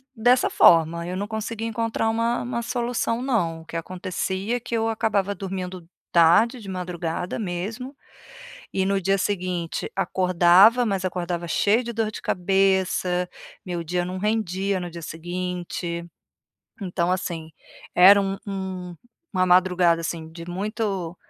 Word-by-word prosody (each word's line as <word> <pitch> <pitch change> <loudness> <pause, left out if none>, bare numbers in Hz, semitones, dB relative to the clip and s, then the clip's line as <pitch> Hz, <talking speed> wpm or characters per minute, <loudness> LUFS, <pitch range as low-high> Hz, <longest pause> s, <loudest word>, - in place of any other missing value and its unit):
dessa 245 +3 +3
forma, 170 +1 +4
eu 180 - -4
não 200 +2 -3
consegui 220 +1 -4
encontrar 225 0 -1
uma 230 +1 0
uma 240 -1 -3
solução 240 -1 -1
não. 175 -11 0
O - - -16
que 165 - -5
acontecia 185 +5 -3
é - - -6
que 235 - -4
eu 225 0 +1
acabava 205 -3 0
dormindo 185 -2 -6 0.2
tarde, 175 +9 +5
de 205 - -11
madrugada 180 -2 -4
mesmo, 220 +8 -4 0.8
e 190 0 +1
no 195 0 +1
dia 195 +2 +2
seguinte 180 -4 -2
acordava, 190 +5 +5
mas 195 -3 -1
acordava 175 -1 -3
cheio 215 +8 +2
de 235 0 -5
dor 220 -1 -1
de - - -8
cabeça, 185 -1 +1 0.4
meu 175 -2 -3
dia 175 +2 -1
não 185 +1 -5
rendia 200 -2 0
no 175 -1 -5
dia 170 0 -8
seguinte. 175 0 -4 0.8
Então, 180 -1 -1
assim, 170 -3 -3 0.4
era 200 +3 +8
um 195 0 -2
um 185 -2 -5 0.4
uma 185 0 +2
madrugada, 180 -2 +4
assim, 160 -1 -5
de 165 0 -9
muito, 195 -2 -3
185 Hz, 145 wpm, -24 LUFS, 175-215 Hz, 0.8 s, era